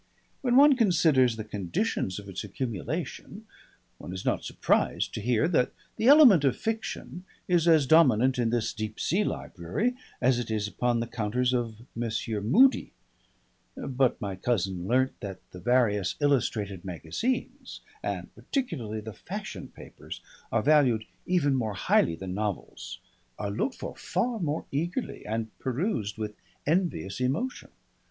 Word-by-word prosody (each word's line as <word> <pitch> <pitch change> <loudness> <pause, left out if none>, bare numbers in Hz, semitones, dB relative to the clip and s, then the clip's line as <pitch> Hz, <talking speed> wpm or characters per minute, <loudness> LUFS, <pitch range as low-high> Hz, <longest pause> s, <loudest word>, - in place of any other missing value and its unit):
When 245 -2 +2
one 285 +1 +8
considers 160 - +4
the 110 - -5
conditions 100 -1 -2
of 100 -1 -8
its 95 -1 -5
accumulation, 115 -8 -5 0.5
one 90 - -7
is 95 - -6
not - - 0
surprised - - 0
to - - -4
hear 125 +6 +2
that 150 -8 +2 0.2
the 225 - 0
element 265 - +8
of 135 - +2
fiction 220 -5 -4 0.2
is 175 -2 +3
as 160 -4 +6
dominant 130 -4 +5
in 115 -2 +2
this 115 -1 0
Deep 110 0 -5
Sea 195 +5 +1
Library 100 - -2 0.3
as 125 -1 +3
it 120 - -4
is 105 -1 -1
upon 120 +2 0
the - - -1
counters 120 +2 0
of 120 -3 -1 0.2
Messrs. 110 -2 -2
Mudie; 255 - +4 0.8
but 130 -1 0
my 100 -4 -3
cousin 95 -4 -1
learnt 130 +3 +1
that 100 -4 -6
the 90 - -9
various 105 -3 +2
illustrated 110 - 0
magazines, 100 - -3 0.2
and - - -4
particularly 120 - -3
the 110 0 -8
fashion - - -7
papers, - - -10 0.3
are 115 - +1
valued 130 -7 +4 0.2
even 170 -6 +2
more 110 -6 -1
highly 85 -2 +2
than 90 +2 -6
novels, 105 0 -4 0.4
are 100 -1 -3
looked 185 - -1
for - - -7
far 240 -1 -1
more 160 -3 -2
eagerly 170 - -3
and 110 0 -3
perused 130 - -2
with 105 -1 -4 0.3
envious 150 - 0
emotion. 150 - -1
120 Hz, 145 wpm, -28 LUFS, 105-160 Hz, 0.8 s, one